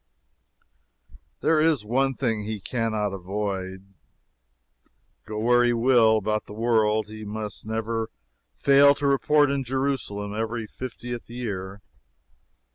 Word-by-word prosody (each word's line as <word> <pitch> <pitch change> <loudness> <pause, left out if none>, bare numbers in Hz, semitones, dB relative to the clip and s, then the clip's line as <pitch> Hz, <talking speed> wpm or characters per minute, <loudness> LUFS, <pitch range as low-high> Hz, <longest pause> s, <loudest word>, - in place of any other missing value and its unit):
There 160 -1 +3
is 155 -8 +2
one 135 +4 +1
thing 115 -5 -1
he 110 0 -4
can 115 +2 -2
not 105 -2 -1
avoid; 95 0 -4 1.3
go 110 -1 -5
where 120 +3 +4
he 120 0 +3
will 115 -2 +4
about 105 0 -1
the 105 - -9
world, 110 -2 +2
he 110 +1 -9
must 105 0 -6
never 110 0 -2 0.5
fail 140 +1 +6
to 145 0 -4
report 145 +1 +3
in 140 -1 -1
Jerusalem 130 -6 -2
every 115 +1 -3
fiftieth 120 +1 -7
year. 100 -5 -5
110 Hz, 120 wpm, -25 LUFS, 105-125 Hz, 1.3 s, fail